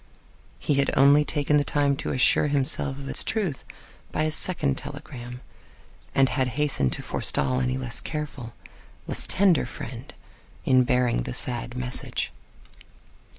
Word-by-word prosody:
He -, -, 0 dB
had 140 Hz, -, 0 dB
only 140 Hz, +2 st, +6 dB
taken 150 Hz, -1 st, +1 dB
the 145 Hz, -, +3 dB
time 145 Hz, -1 st, +1 dB
to -, -, -3 dB
assure 130 Hz, +3 st, +4 dB
himself 140 Hz, -1 st, 0 dB
of 140 Hz, -1 st, -8 dB
its -, -, 0 dB
truth 195 Hz, -, -2 dB, 0.5 s
by 155 Hz, -, 0 dB
a 155 Hz, -, 0 dB
second 155 Hz, -4 st, -1 dB
telegram, 125 Hz, -4 st, -7 dB, 0.7 s
and 135 Hz, -1 st, +5 dB
had 130 Hz, -1 st, 0 dB
hastened 140 Hz, -, +2 dB
to -, -, -3 dB
forestall 130 Hz, 0 st, +1 dB
any 130 Hz, 0 st, 0 dB
less 125 Hz, -3 st, -3 dB
careful, 145 Hz, -6 st, -5 dB, 0.5 s
less -, -, -2 dB
tender 185 Hz, -9 st, +3 dB
friend 125 Hz, +2 st, -8 dB, 0.5 s
in 130 Hz, -1 st, +5 dB
bearing 125 Hz, -, +2 dB
the 60 Hz, -, -5 dB
sad 120 Hz, 0 st, -2 dB
message. 125 Hz, 0 st, -2 dB
135 Hz, 145 wpm, -25 LUFS, 125-150 Hz, 0.7 s, only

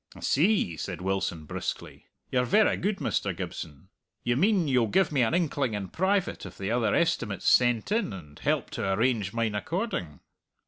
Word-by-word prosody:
"I -, -, -12 dB
see," 150 Hz, -, +2 dB
said 90 Hz, -1 st, -5 dB
Wilson 90 Hz, -4 st, -2 dB
briskly. -, -, -6 dB, 0.2 s
"You're 125 Hz, -1 st, +2 dB
verra 210 Hz, -, +3 dB
good, 205 Hz, +1 st, -1 dB
Mr. -, -, -1 dB
Gibson. 80 Hz, +4 st, -7 dB, 0.3 s
You 120 Hz, -, +1 dB
mean 185 Hz, -, +3 dB
you'll 125 Hz, -4 st, +3 dB
give 190 Hz, -, +2 dB
me 140 Hz, -4 st, +2 dB
an 120 Hz, +7 st, +2 dB
inkling 140 Hz, -9 st, 0 dB
in 100 Hz, -3 st, -4 dB
private 190 Hz, +1 st, 0 dB
of 95 Hz, -2 st, -9 dB
the 95 Hz, +2 st, -3 dB
other 120 Hz, -1 st, +2 dB
estimates 125 Hz, -, 0 dB
sent 120 Hz, -, +4 dB
in, 215 Hz, -, +1 dB
and 75 Hz, -7 st, -10 dB
help -, -, 0 dB
to 95 Hz, -, -2 dB
arrange 110 Hz, -3 st, +1 dB
mine 115 Hz, -1 st, -1 dB
according?" 105 Hz, -, -3 dB
120 Hz, 175 wpm, -28 LUFS, -, 0.3 s, sent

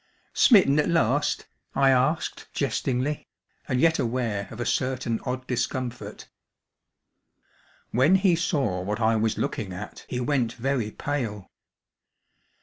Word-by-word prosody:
"Smitten 185 Hz, -, +5 dB
at 150 Hz, -, +1 dB
last?" 145 Hz, -3 st, +1 dB, 0.3 s
I 135 Hz, -1 st, +5 dB
asked 135 Hz, +5 st, 0 dB
jestingly, 135 Hz, +4 st, -1 dB, 0.4 s
and 130 Hz, -3 st, 0 dB
yet 160 Hz, +3 st, +3 dB
aware 115 Hz, -5 st, -1 dB
of 115 Hz, -, -10 dB
a 120 Hz, -, -2 dB
certain 130 Hz, -3 st, -1 dB
odd 130 Hz, 0 st, -3 dB
discomfort. 125 Hz, 0 st, -4 dB, 1.6 s
When, 135 Hz, +10 st, +4 dB
he 190 Hz, -2 st, +4 dB
saw 140 Hz, -, 0 dB
what 105 Hz, +4 st, -3 dB
I 110 Hz, 0 st, +3 dB
was 110 Hz, 0 st, 0 dB
looking 100 Hz, -4 st, -3 dB
at 90 Hz, -, -9 dB
he 125 Hz, -, -2 dB
went 125 Hz, -3 st, 0 dB
very 125 Hz, -3 st, -1 dB
pale. 115 Hz, -6 st, -4 dB
125 Hz, 125 wpm, -26 LUFS, 115-145 Hz, 1.6 s, Smitten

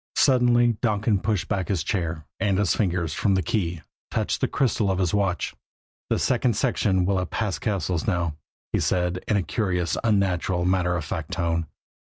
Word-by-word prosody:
Suddenly 120 Hz, -3 st, +4 dB
Donkin 110 Hz, -2 st, +1 dB
pushed 100 Hz, -1 st, -1 dB
back 95 Hz, -3 st, -1 dB
his 95 Hz, -6 st, 0 dB
chair; 85 Hz, -6 st, -2 dB
and 100 Hz, -2 st, +1 dB
his 100 Hz, -3 st, +2 dB
fingers, 90 Hz, -6 st, 0 dB
from 100 Hz, +4 st, +1 dB
the 95 Hz, -, +1 dB
key, 85 Hz, -3 st, -1 dB, 0.3 s
touched -, -, -1 dB
the -, -, +3 dB
crystal 115 Hz, -6 st, +1 dB
of 95 Hz, -, +1 dB
his 90 Hz, -3 st, 0 dB
watch. 100 Hz, -4 st, 0 dB, 0.6 s
"The -, -, +2 dB
second 125 Hz, -2 st, +1 dB
section 100 Hz, -6 st, +1 dB
will 95 Hz, 0 st, +1 dB
have 90 Hz, -, -3 dB
passed 105 Hz, -4 st, -2 dB
Cassil's 95 Hz, -5 st, -1 dB
now," 85 Hz, -6 st, 0 dB, 0.4 s
he -, -, +2 dB
said 90 Hz, 0 st, 0 dB
in 105 Hz, -, +2 dB
a 95 Hz, -, +1 dB
curious, 90 Hz, -1 st, -1 dB
unnatural, 95 Hz, -4 st, +1 dB
matter 90 Hz, -1 st, +2 dB
of 85 Hz, -3 st, -3 dB
fact 80 Hz, -1 st, -4 dB
tone. 85 Hz, -2 st, -1 dB
95 Hz, 180 wpm, -25 LUFS, 90-105 Hz, 0.6 s, Suddenly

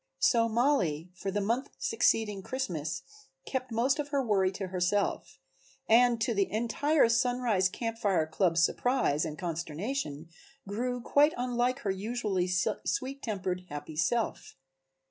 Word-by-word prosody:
So 235 Hz, -, +3 dB
Mollie 200 Hz, -, +1 dB
for 185 Hz, +2 st, -5 dB
the 205 Hz, +2 st, -1 dB
month 235 Hz, +6 st, -1 dB
succeeding 220 Hz, -, +1 dB
Christmas 175 Hz, -, -3 dB, 0.4 s
kept 260 Hz, -2 st, -3 dB
most 255 Hz, +6 st, +1 dB
of 290 Hz, -, -2 dB
her 280 Hz, -2 st, 0 dB
worry 195 Hz, -4 st, +2 dB
to 190 Hz, -1 st, -5 dB
herself, 185 Hz, +2 st, -1 dB, 0.5 s
and 235 Hz, +1 st, +5 dB
to 235 Hz, +2 st, +1 dB
the 200 Hz, -2 st, 0 dB
entire 240 Hz, +7 st, +2 dB
Sunrise 235 Hz, -5 st, +2 dB
Camp 230 Hz, +3 st, -4 dB
Fire 195 Hz, -7 st, +2 dB
club's 165 Hz, +1 st, +2 dB
surprise 245 Hz, -, +1 dB
and 155 Hz, -1 st, -5 dB
consternation 165 Hz, -, -4 dB, 0.4 s
grew 245 Hz, +5 st, -2 dB
quite 290 Hz, +5 st, +4 dB
unlike 250 Hz, +1 st, 0 dB
her 200 Hz, -, 0 dB
usually 200 Hz, -2 st, -1 dB, 0.4 s
sweet 275 Hz, -8 st, -2 dB
tempered, 185 Hz, -5 st, -3 dB
happy 145 Hz, +1 st, -7 dB
self. 215 Hz, +9 st, -1 dB
220 Hz, 135 wpm, -30 LUFS, 180-250 Hz, 0.5 s, and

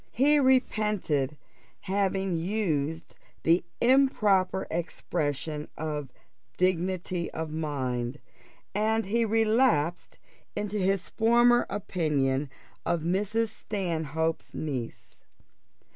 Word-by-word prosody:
He 290 Hz, +4 st, +4 dB
repented 210 Hz, -, +1 dB, 0.4 s
having 195 Hz, -1 st, 0 dB
used 165 Hz, -4 st, -1 dB, 0.3 s
the 165 Hz, +2 st, +4 dB, 0.2 s
improper 215 Hz, -8 st, +3 dB
expression 150 Hz, -3 st, -2 dB
of 150 Hz, -4 st, -4 dB, 0.5 s
dignity 180 Hz, -1 st, 0 dB
of 160 Hz, -1 st, -4 dB
mind, 130 Hz, -5 st, -2 dB, 0.6 s
and 220 Hz, +2 st, +1 dB
he 230 Hz, +4 st, +1 dB
relapsed 220 Hz, -, +2 dB, 0.4 s
into 210 Hz, 0 st, -2 dB
his 195 Hz, -1 st, 0 dB
former 240 Hz, +2 st, +4 dB
opinion 145 Hz, -7 st, 0 dB, 0.3 s
of 170 Hz, -2 st, 0 dB
Mrs. 210 Hz, +6 st, 0 dB
Stanhope's 165 Hz, -7 st, -3 dB
niece. 130 Hz, -7 st, -5 dB
180 Hz, 85 wpm, -28 LUFS, 155-215 Hz, 0.6 s, He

